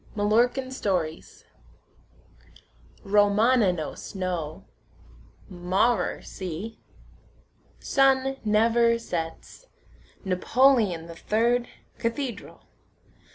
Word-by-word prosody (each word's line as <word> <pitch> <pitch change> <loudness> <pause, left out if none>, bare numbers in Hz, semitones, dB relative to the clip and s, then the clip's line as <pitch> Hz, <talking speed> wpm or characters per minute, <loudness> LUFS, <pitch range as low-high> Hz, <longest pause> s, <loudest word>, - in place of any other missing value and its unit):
MALLORCAN 240 +5 +1
STORIES 180 -11 -3 1.6
Romanonos 205 -3 +2
no. 175 -5 -4 0.8
Maurer 185 +6 0
see. 190 +4 -7 1.0
Sun 270 0 +2
never 230 +2 +3
sets. 175 - -6 0.6
Napoleon 200 -2 +2
the 170 0 -10
third, 235 +6 0 0.3
cathedral. 235 +1 -4
215 Hz, 60 wpm, -26 LUFS, 180-245 Hz, 1.6 s, never